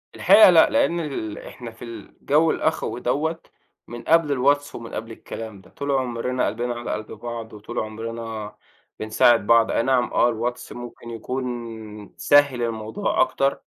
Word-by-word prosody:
الحقيقة 215 -3 +7
لأ 165 -2 +6
لإن 280 -12 +2
ال 120 -9 -4
إحنا 120 -3 -9
في 115 +1 -11
الجو 145 +6 0
الأخوي 160 -5 -1
دوّة 155 +6 -1 0.5
من 120 0 -8
قبل 165 0 +3
الواتس 140 +2 +1
ومن 115 -1 -8
قبل 115 +1 -5
الكلام 110 -3 -8
ده. - - -20
طُول 140 0 -4
عمرنا 125 -1 -1
قلبِنا 120 +4 -2
على 120 0 -5
قلْب 110 0 -6
بعض 115 -2 -7
وطُول 105 +3 -6
عمرنا 110 -1 -6 0.4
بنساعد 110 0 +3
بعض. 115 -1 +5
أي - - +1
نعم 125 -1 +1
آه 120 - +4
الواتس 120 +1 -4
ممكن 120 -1 -9
يكُون 115 -3 -6
سهّل 145 -4 +4
الموضوع 115 - -1
أكتر، 135 0 +1
120 Hz, 155 wpm, -23 LUFS, 115-135 Hz, 0.5 s, الحقيقة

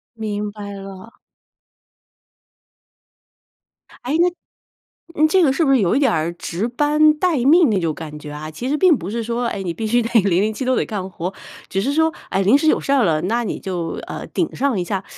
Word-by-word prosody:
明 210 -2 -4
白 205 -1 -8
了。 195 +4 -11 2.9
诶， 285 +6 0
那 350 - +5 0.9
你 310 - +6
这 370 +3 +3
个 270 - +4
是 320 +4 +1
不 275 - +3
是 265 - +4
有 185 -4 +2
一 - - +3
点 270 -5 +3
儿 160 +1 0
值 180 +5 -3
班 300 +4 +3
待 335 -1 +1
命 315 0 +5
那 200 -3 +1
种 165 -3 -1
感 150 -1 -8
觉 150 0 -9
啊？ 150 +1 -7
其 245 - -5
实 300 - +1
并 360 -3 +5
不 180 +2 -6
是 230 +1 -3
说， 235 +2 -2
哎， 200 - -3
你 170 -2 -3
必 225 - -4
须 240 +2 +2
得 230 - -3
007 205 +6 0
都 255 0 +1
得 - - 0
干 195 -4 -4
活， 180 +1 -5 0.3
只 195 - -1
是 275 - 0
说， 320 +1 +2 0.2
哎， 195 - 0
临 215 +9 +5
时 315 - 0
有 - - +4
事 275 - -3
儿 270 -4 +4
了， 155 -4 +1
那 235 +5 0
你 210 - -4
就， 175 -3 -4
呃， - - -6
顶 335 - -2
上 260 -7 0
一 - - -1
下。 195 +1 -3
220 Hz, 225 characters per minute, -20 LUFS, 190-280 Hz, 2.9 s, 你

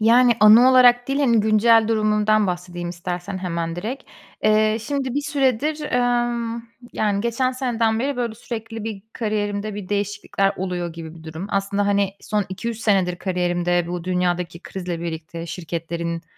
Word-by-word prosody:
Yani, 240 +3 +6
anı 225 +5 +8
olarak 245 -1 +6
değil, 275 +1 0
hani, 235 -5 +4
güncel 220 +1 +4
durumumdan 215 -1 +2
bahsedeyim 175 -1 -4
istersen 180 +2 -5
hemen 170 -2 -3
direkt. 230 +9 -4 0.4
Eee, 215 0 +4
şimdi 265 +1 -3
bir 290 - +1
süredir, 285 +1 0
emm, 240 -1 0 0.3
yani, 205 -2 0
geçen 245 +3 0
seneden 230 -3 0
beri, 275 +1 -1
böyle 235 -3 -2
sürekli 225 -1 -6
bir 215 -3 -5
kariyerimde 210 -1 -2
bir 200 -3 -7
değişiklikler 200 -1 0
oluyor 180 -2 -3
gibi 160 -1 -9
bir 165 - -13
durum. 160 +4 -6
Aslında, 200 +1 0
hani, 200 -1 +2
son 210 -2 -1
2-3 225 +4 -4
senedir 190 -5 +1
kariyerimde 175 -1 0
bu 175 -1 -4
dünyadaki 180 -1 -1
krizle 180 -3 -5
birlikte, 165 0 -6
şirketlerin 170 0 -4
205 Hz, 150 wpm, -22 LUFS, 180-235 Hz, 0.4 s, anı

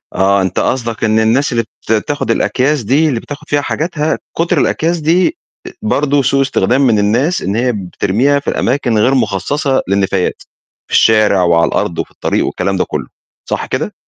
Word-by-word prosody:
آه، 100 +1 +3
أنت 95 - -1
قصدك 115 -3 -2
إن 110 0 +2
الناس 120 +6 +2
اللي 115 -1 0
بت - - -10 0.2
تاخد 145 0 -1
الأكياس 135 +1 0
دي، 145 +8 +2
اللي 120 - -1
بتاخد 145 +5 -10
فيها 145 0 +1
حاجاتها، 155 +1 -2 0.2
كُتْر 165 +1 +1
الأكياس 170 +2 0
دي 180 - +1 0.4
برضه 145 -8 +1
أ 140 - +1
سوء 135 +1 +2
استخدام 135 -1 +1
من 110 -3 +3
الناس 120 - +1
إن 100 +2 -2
هي 125 +2 +1
بترميها 105 +7 0
في 140 - -4
الأماكن 125 -3 0
غير 125 +6 +3
مخصصة 130 - 0
للنفايات، 95 -1 0 0.5
في - - -10
الشارع، 105 -4 +4
وعلى 85 -1 +3
الأرض، - - -2
وفي - - -4
الطريق، - - -1
والكلام - - -2
ده - - +2
كُلّه، - - -4 0.4
صح - - -2
كده؟ - - -3
125 Hz, 180 wpm, -14 LUFS, 105-145 Hz, 0.5 s, الشارع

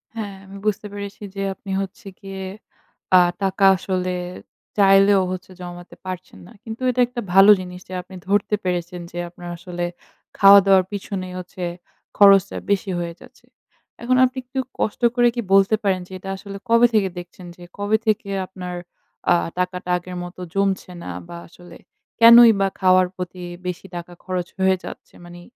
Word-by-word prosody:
হ্যাঁ, 205 -3 -5
আমি 195 +1 -11
বুঝতে 210 0 -1
পেরেছি 200 0 -7
যে, 195 - -4
আপনি 195 - -9
হচ্ছে 195 +2 -8
গিয়ে, 195 -1 -7 0.7
আ - - +8 0.2
টাকা 195 +1 +2
আসলে 185 -1 -2 0.6
চাইলেও 195 0 +5
হচ্ছে 185 0 -7
জমাতে 175 0 -9
পারছেন 185 - -7
না। - - -16
কিন্তু 225 +1 -8
এটা 250 0 -1
একটা 245 -1 -5
ভালো 195 +2 +8
জিনিস 180 0 -8
যে, - - -7
আপনি 185 +1 -14
ধরতে 205 +1 +1
পেরেছেন 180 -1 -3
যে, 175 - -9
আপনার 175 0 -10
আসলে 175 0 -6 0.5
খাওয়া-দাওয়ার 195 -1 +7
পিছনে 195 -2 -5
হচ্ছে 180 0 -8 0.5
খরচটা 200 -1 +6
বেশি 200 -1 0
হয়ে 170 -1 -4
যাচ্ছে। - - -18 0.6
এখন 255 +2 +2
আপনি 255 +1 -4
একটু 265 +1 -5 0.2
কষ্ট 215 - -2
করে 240 0 +4
কি 240 - -1
বলতে 195 +2 +5
পারেন 190 -2 +1
যে, - - -20
এটা 195 - -8
আসলে 200 0 -9
কবে 230 +1 +6
থেকে 200 -3 +2
দেখছেন? 175 +1 -12
যে, 175 - -14
কবে 205 +2 +1
থেকে 210 -2 0 0.2
আপনার 180 -1 -7 0.6
আ - - +6 0.2
টাকাটা 180 0 -3
আগের 180 +1 -9
মত 175 +1 -10 0.2
জমছে 195 -2 -1
না - - -7 0.2
বা, 170 0 -8
আসলে 175 0 -15 0.4
কেনই 235 0 +9
বা 195 - +3
খাওয়ার 185 -1 +4
প্রতি 180 0 -7 0.2
বেশি 180 +1 -5
টাকা 175 0 -7
খরচ 180 -2 -3
হয়ে 190 0 +3
যাচ্ছে? - - -10
মানি, 175 0 -12
190 Hz, 165 wpm, -21 LUFS, 180-200 Hz, 0.7 s, কেনই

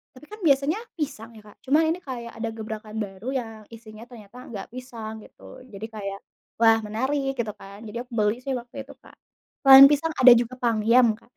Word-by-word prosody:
Tapi 255 - -15
kan 425 - -10
biasanya 280 +5 +2 0.2
pisang 265 -7 -5
ya, 215 - -13
Kak, 210 - -17
cuma 280 +4 +3
ini 330 +3 -1
kayak 235 -3 -6
ada 225 0 -3
gebrakan 215 -1 -8
baru 195 +3 -10
yang 230 -3 -5 0.2
isinya 220 -1 -13
ternyata 225 -2 -14
enggak 205 -5 -8
pisang 230 -4 -8
gitu. - - -15
Jadi 200 +2 -7
kayak, 195 -2 -6 0.4
"Wah, 225 -1 +5
menarik," 265 +6 -2
gitu 225 -3 -2
kan. 200 +3 -13
Jadi 215 +1 -7
aku 250 +1 -14
beli 210 +3 0
sih 265 0 -3
waktu 240 0 -9
itu, - - -14
Kak. - - -19 0.5
Selain 270 0 +11
pisang 300 +3 0
ada 255 -1 +8
juga 240 +1 -1
pangyam, 235 0 +3
Kak. 225 +2 -18
235 Hz, 195 wpm, -24 LUFS, 215-260 Hz, 0.5 s, Selain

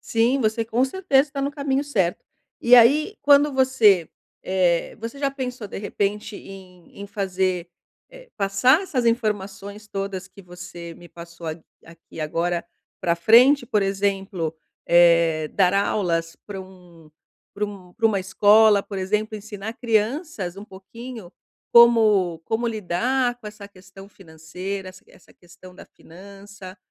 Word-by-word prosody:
Sim, 235 +4 +1
você 220 0 0
com 235 +3 +1
certeza 285 -3 +1
tá 275 - -3
no 280 - -1
caminho 280 -1 -2
certo. 190 -11 -1 0.4
E 240 +1 +6
aí, 290 - +5
quando 285 0 +5
você 235 - +3 0.3
eh, 180 -2 0
você 230 +5 -7
já 275 -1 0
pensou 255 -4 -6
de - - -7
repente 205 +1 -3
em 185 -1 -14
em 200 - -7
fazer 185 -3 -2 0.4
eh, - - -15
passar 200 - +3
essas 260 -10 -2
informações 210 -2 -2
todas 195 -2 -5
que 200 +1 -16
você 175 -1 -10
me 175 - -15
passou 170 0 -12
a 155 0 -4 0.3
aqui 165 -1 -13
agora, 170 +3 -2 0.4
pra 170 - +1
frente? 240 +10 +5
Por 210 -2 +1
exemplo, 195 -4 -2 0.3
eh, 170 -2 +4
dar 185 +2 +2
aulas 170 -5 -1
pra 195 -2 -7
um 175 -4 -16 0.4
pra 210 - -2
um 195 -3 -10
para 225 +2 +1
uma 200 -3 0
escola, 205 +2 +4
por 200 -2 -7
exemplo, 210 +3 -2
ensinar 210 +1 -7
crianças 225 - -2
um 200 - -9
pouquinho 220 +1 -11 0.4
como 215 -8 +5
como 225 +2 -2
lidar 240 +4 -1
com 215 - -11
essa 210 -1 -10
questão 195 0 -15
financeira, 185 +2 -8
essa 185 0 -15
essa - - -21
questão 180 +1 -17
da - - -13
finança 195 +2 -14
200 Hz, 145 wpm, -22 LUFS, 180-230 Hz, 0.4 s, E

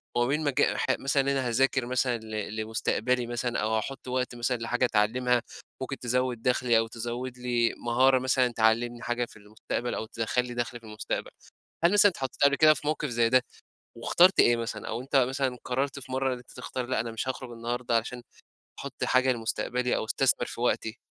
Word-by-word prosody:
وما 120 0 +2
بين 150 +4 0
مج 145 -3 +1
ح - - +1
مثلًا 135 0 +2
أنا 135 -2 0
هاذاكر 130 +1 +2
مثلًا 125 -1 0
ل 110 -1 -5
لمستقبلي 110 +2 -1
مثلًا 120 0 -2
أو 110 +1 0
هاحط 130 +5 -4
وقت 125 -1 -2
مثلًا 120 +1 -1
لحاجة 120 +2 0
أتعلّمها، 120 +2 +2 0.4
ممكن 135 +1 -4
تزوّد 125 -1 -1
دخلي 125 -1 +2
أو 115 0 +1
تزوّد 120 +2 -5
لي 120 -2 +1
مهارة 130 +2 +4
مثلًا 130 0 +2
تعلّمني 115 +2 +1
حاجة 120 0 -1
في 110 - -16
المستقبل 110 +3 -4
أو 110 - -3
تدخَّل 115 +2 -1
لى 120 - -7
دَخل 120 0 -3
في 115 - -18
المستقبل، 105 0 -4 0.5
هل 175 - +5
مثلًا 205 -1 +6
اتحطيت 135 -6 -5
قبل 140 0 +5
كده 155 0 +6
في 150 - -7
موقف 150 0 -1
زي 115 -2 +2
ده؟ 130 +1 +4 0.5
واخترت 185 +2 +4
إيه 120 - +6
مثلًا؟ 115 -2 -5
أو 115 - -3
أنت 135 +2 -5
مثلًا 130 0 +1
قرّرت 135 +3 -1
في 130 0 -10
مَرّة 130 0 0
إن 125 - -5
أنت 120 - -15
تختار 125 0 -5
لأ 130 -2 -1
أنا 115 0 -3
مش 115 +3 -4
هاخرج 130 -1 -4
النهارده 120 0 -1
عشان 120 +2 -4 0.6
أحط - - -5
حاجة 130 0 +3
لمستقبلي 125 +2 -1
أو - - -2
استثمر 125 +1 +1
في - - -7
وقتي. 120 -1 0
125 Hz, 195 wpm, -28 LUFS, 115-130 Hz, 0.6 s, مثلًا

